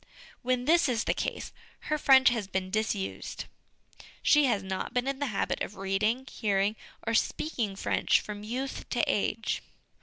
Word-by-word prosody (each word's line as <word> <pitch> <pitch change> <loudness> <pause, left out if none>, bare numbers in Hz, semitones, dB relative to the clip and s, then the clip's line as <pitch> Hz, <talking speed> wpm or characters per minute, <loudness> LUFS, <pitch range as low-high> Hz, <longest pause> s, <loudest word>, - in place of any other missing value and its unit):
When 250 0 0
this 335 0 +4
is 235 -2 +1
the - - +1
case, - - -3 0.3
her 305 0 -1
French 265 -2 +7
has 230 -5 -2
been 185 -1 -3
dis 215 +1 +1
used; 195 -1 -5 0.8
she 295 -1 +5
has 210 -6 +1
not 190 +4 -4
been 250 +1 +1
in 275 -1 -2
the 285 - 0
habit 205 -5 -1
of 205 - -3
reading, 210 +6 0
hearing, 205 -4 0 0.3
or 230 - 0
speaking 230 -3 0
French - - +2
from 205 -1 -7
youth 250 +6 -4
to - - 0
age. - - 0
225 Hz, 170 wpm, -29 LUFS, 200-265 Hz, 0.8 s, French